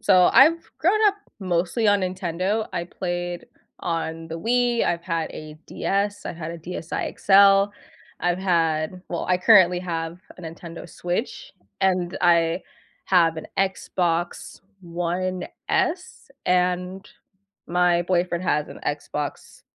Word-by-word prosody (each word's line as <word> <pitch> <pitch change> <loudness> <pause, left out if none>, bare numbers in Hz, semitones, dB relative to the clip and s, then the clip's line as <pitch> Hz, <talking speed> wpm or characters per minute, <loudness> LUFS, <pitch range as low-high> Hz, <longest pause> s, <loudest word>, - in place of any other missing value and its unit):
so 185 -3 +5
I've 315 +7 +5
grown 365 +10 +3
up 400 - +4 0.3
mostly 185 +4 0
on 205 0 +4
Nintendo. 185 +3 -1
I 170 - -1
played 175 -1 -4 0.3
on 165 -1 -3
the 165 +1 -5
Wii, 240 +4 +1
I've 170 - 0
had 165 -2 -2
a 155 0 -9
DS, 205 +1 -2
I've - - -5
had 165 -1 -5
a 170 - -8
DSi 170 0 -5
XL. 200 0 +6 0.5
I've 175 0 0
had 170 -1 0
well, 170 - -3
I 180 - +4
currently 180 -3 +6
have 165 -1 -4 0.2
a 180 - -11
Nintendo 165 +1 -9
Switch, 200 - -4 0.3
and 185 -2 +1
I 170 0 +3 0.5
have 165 -3 +4
an - - -8
Xbox 175 -3 -1 0.2
One 175 +2 -3 0.2
S, 360 -3 -1 0.2
and 180 +1 0 0.6
my 175 0 +3
boyfriend 175 0 0
has 150 -3 0
an - - -10
Xbox, 145 0 -5
180 Hz, 130 wpm, -23 LUFS, 170-195 Hz, 0.6 s, XL